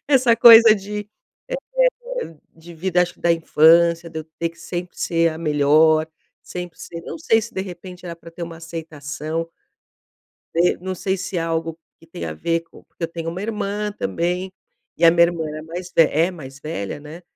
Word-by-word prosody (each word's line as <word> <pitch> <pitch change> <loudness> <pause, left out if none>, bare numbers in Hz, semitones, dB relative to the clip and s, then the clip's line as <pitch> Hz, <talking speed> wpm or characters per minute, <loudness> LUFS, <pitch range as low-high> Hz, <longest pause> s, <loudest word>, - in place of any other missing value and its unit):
Essa 260 -4 +5
coisa 230 -1 +9
de 210 +1 -5 1.0
eh, - - -5 0.2
de 170 +1 -14
vida, 180 +2 +1
acho 180 0 -1
que - - -26
da 170 - +3
infância, 170 +1 +4
de 160 -1 -5
eu 155 - -6
ter 170 0 -1
que 170 - -20
sempre 175 +1 -6
ser 165 -1 +2
a 160 - -7
melhor, 155 +1 +4 0.4
sempre 175 -1 -7
ser 170 - -8
não - - -6
sei 225 -9 +2
se, 235 +2 -8
de 190 - -2
repente, 180 -1 -9
era 170 - -6
pra 170 - -13
ter 170 +1 -6
uma 165 -1 -8
aceitação. 160 -1 -5 1.1
De 175 +2 +3
não 185 +1 -4
sei 190 +1 -1
se 185 0 -5
é - - +1
algo 165 0 -2 0.2
que 165 - -19
tem 85 - -7
a 80 - -5
ver 165 - 0
co 165 - -18
porque 170 - -7
eu - - -2
tenho 165 0 -5
uma 180 - -6
irmã 210 -1 -2
também, 185 -4 -2 0.4
e 170 - +2
a 165 - +9
minha 170 0 +4
irmã 165 -3 -3
era 155 0 -6
mais 175 +3 -7
ve - - +9
é 165 +5 +2
mais 135 -5 -11
velha, 145 -6 -5
né. 155 +4 -11
170 Hz, 200 wpm, -21 LUFS, 160-185 Hz, 1.1 s, coisa